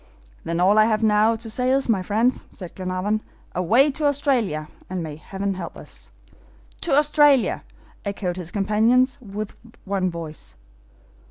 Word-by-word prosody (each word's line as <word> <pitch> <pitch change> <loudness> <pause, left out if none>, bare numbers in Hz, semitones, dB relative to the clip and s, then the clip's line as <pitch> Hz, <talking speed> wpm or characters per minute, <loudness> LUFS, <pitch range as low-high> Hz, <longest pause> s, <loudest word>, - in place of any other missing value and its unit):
"Then 170 +1 -2
all 195 +4 +5
I 215 - +7
have 220 0 +1
now 215 +1 +4
to 225 +1 -9
say 250 +3 -1
is, 270 +1 +2
my 215 -5 +2
friends," 220 +7 +1
said 180 -3 -9
Glenarvan, 185 +3 -2 0.3
"away 230 - +3
to 300 +2 -2
Australia, 245 - 0 0.2
and 185 -2 -3
may 155 -2 -6
Heaven 195 +5 -4
help 185 - -7
us!" - - -12 0.7
"To 335 - 0
Australia!" 295 -2 +4 0.4
echoed 200 -3 -3
his 180 -2 -6
companions, 220 +6 +2
with 210 -1 -6 0.3
one 190 -2 0
voice. 165 - -8
210 Hz, 150 wpm, -23 LUFS, 185-250 Hz, 0.7 s, I